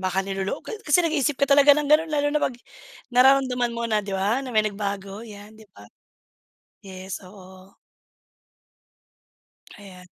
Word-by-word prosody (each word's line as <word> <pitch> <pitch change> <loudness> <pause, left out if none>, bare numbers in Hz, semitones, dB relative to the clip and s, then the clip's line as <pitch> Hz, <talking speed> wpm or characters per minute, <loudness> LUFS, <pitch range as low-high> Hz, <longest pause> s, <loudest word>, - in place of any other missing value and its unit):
baka 190 +1 -1
nilolok 195 0 -4
ka - - -9 0.2
kasi 295 +3 +4
nag-iisip 295 -3 0
ka 280 - +2
talaga 285 0 +6
ng 300 - -1
ganon 310 +2 +3
lalo 290 -1 0
na 300 - 0
pag 250 - -2 0.6
nararamdaman 250 -1 +3
mo 235 0 -4
na 215 -2 0
'di 200 -1 -8
ba 205 +7 0
na 270 - -7
may 215 -1 +2
nagbago 200 -1 -5
yan, 210 -1 -12
'di 220 - -16
ba? 100 - -15 1.0
Yes, 190 -1 -8
oo. 185 0 -16 2.0
Ayan. 185 -3 -14
215 Hz, 155 wpm, -23 LUFS, 195-275 Hz, 2.0 s, talaga